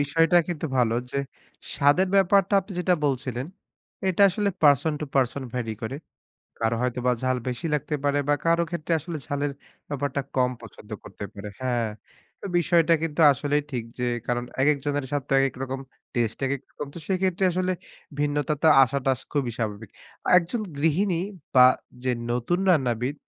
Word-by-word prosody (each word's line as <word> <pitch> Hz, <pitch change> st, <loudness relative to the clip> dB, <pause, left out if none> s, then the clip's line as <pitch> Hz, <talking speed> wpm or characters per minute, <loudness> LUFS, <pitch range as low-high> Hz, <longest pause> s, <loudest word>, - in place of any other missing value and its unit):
বিষয়টা 165 Hz, +4 st, +3 dB
কিন্তু 160 Hz, -3 st, -3 dB
ভালো 115 Hz, -2 st, +3 dB, 0.2 s
যে, -, -, -2 dB, 0.6 s
স্বাদের 145 Hz, +7 st, +3 dB
ব্যাপারটা 195 Hz, +1 st, +4 dB
আপনি 195 Hz, -, -11 dB
যেটা 180 Hz, 0 st, +3 dB
বলছিলেন, 130 Hz, -1 st, -2 dB, 0.6 s
"এটা 190 Hz, +2 st, +2 dB
আসলে 205 Hz, +2 st, 0 dB
person 145 Hz, +1 st, +5 dB
to -, -, -1 dB
person 135 Hz, +1 st, +1 dB
vary 115 Hz, -3 st, -2 dB
করে।" 120 Hz, +5 st, -3 dB, 0.6 s
কারো 115 Hz, 0 st, +1 dB
হয়তোবা 125 Hz, 0 st, 0 dB
ঝাল 130 Hz, 0 st, +1 dB
বেশি 125 Hz, +7 st, -3 dB
লাগতে 150 Hz, +1 st, -2 dB
পারে 145 Hz, 0 st, +2 dB
বা 145 Hz, -, +5 dB
কারো 170 Hz, +1 st, +4 dB
ক্ষেত্রে 170 Hz, -1 st, -3 dB
আসলে 160 Hz, +1 st, -6 dB
ঝালের 145 Hz, +1 st, -1 dB, 0.4 s
ব্যাপারটা 140 Hz, 0 st, -2 dB, 0.2 s
কম 125 Hz, -1 st, +3 dB
পছন্দ 110 Hz, -1 st, -13 dB
করতে 100 Hz, -, -9 dB
পারে 100 Hz, +1 st, -7 dB
হ্যাঁ। 120 Hz, -3 st, 0 dB, 0.5 s
তো -, -, -12 dB
বিষয়টা 170 Hz, -1 st, +4 dB
কিন্তু 165 Hz, 0 st, -2 dB
আসলেই 145 Hz, +2 st, 0 dB
ঠিক 120 Hz, -3 st, -3 dB
যে 125 Hz, -, 0 dB, 0.2 s
কারণ, 120 Hz, 0 st, -1 dB, 0.2 s
একেক 145 Hz, +2 st, +4 dB
জনের 145 Hz, -1 st, -1 dB
স্বাদ 145 Hz, -1 st, -1 dB
তো -, -, -2 dB
একেক 135 Hz, -1 st, +1 dB
রকম, 135 Hz, 0 st, -4 dB, 0.3 s
taste 115 Hz, -3 st, -1 dB
একেক 135 Hz, 0 st, -1 dB
রকম। 150 Hz, -, -6 dB
তো -, -, -7 dB
সেক্ষেত্রে 190 Hz, -1 st, 0 dB
আসলে 185 Hz, +1 st, 0 dB, 0.5 s
ভিন্নতা 145 Hz, +1 st, 0 dB
তো 160 Hz, -, +6 dB
আসাটা 135 Hz, 0 st, +1 dB
খুবই 135 Hz, -6 st, 0 dB
স্বাভাবিক। 110 Hz, -2 st, -4 dB, 0.5 s
একজন 180 Hz, +7 st, -3 dB, 0.2 s
গৃহিণী 165 Hz, +4 st, +1 dB, 0.3 s
বা 125 Hz, -1 st, +9 dB, 0.4 s
যে 130 Hz, -, +2 dB, 0.2 s
নতুন 125 Hz, +9 st, 0 dB
রান্নাবিদ, 125 Hz, -4 st, +1 dB
145 Hz, 160 wpm, -25 LUFS, 125-165 Hz, 0.6 s, বা